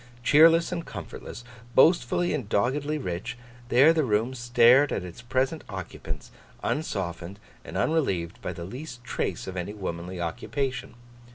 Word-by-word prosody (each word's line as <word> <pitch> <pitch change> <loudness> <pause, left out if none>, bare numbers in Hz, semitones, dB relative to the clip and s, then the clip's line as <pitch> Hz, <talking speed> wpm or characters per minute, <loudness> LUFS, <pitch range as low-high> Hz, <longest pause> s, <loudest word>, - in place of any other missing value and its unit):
Cheerless 165 +6 +6
and 170 -2 -3
comfortless, 120 - -8 0.3
boastfully 165 +3 +4
and 130 -9 -3
doggedly 140 +8 +1
rich, 120 - -4 0.3
there 135 +7 +6
the 160 -2 +2
room 115 +1 +1
stared 120 +3 +5
at - - -2
its 90 +5 -9
present 130 +6 -1
occupants, 95 -2 -7 0.3
unsoftened 95 - -3 0.3
and - - -6
unrelieved 95 - 0
by - - -3
the 85 - -7
least 125 - -8
trace - - -3
of 95 - -6
any 95 +3 -4
womanly 90 -2 -5
occupation. 130 - -3
120 Hz, 140 wpm, -27 LUFS, 95-145 Hz, 0.3 s, Cheerless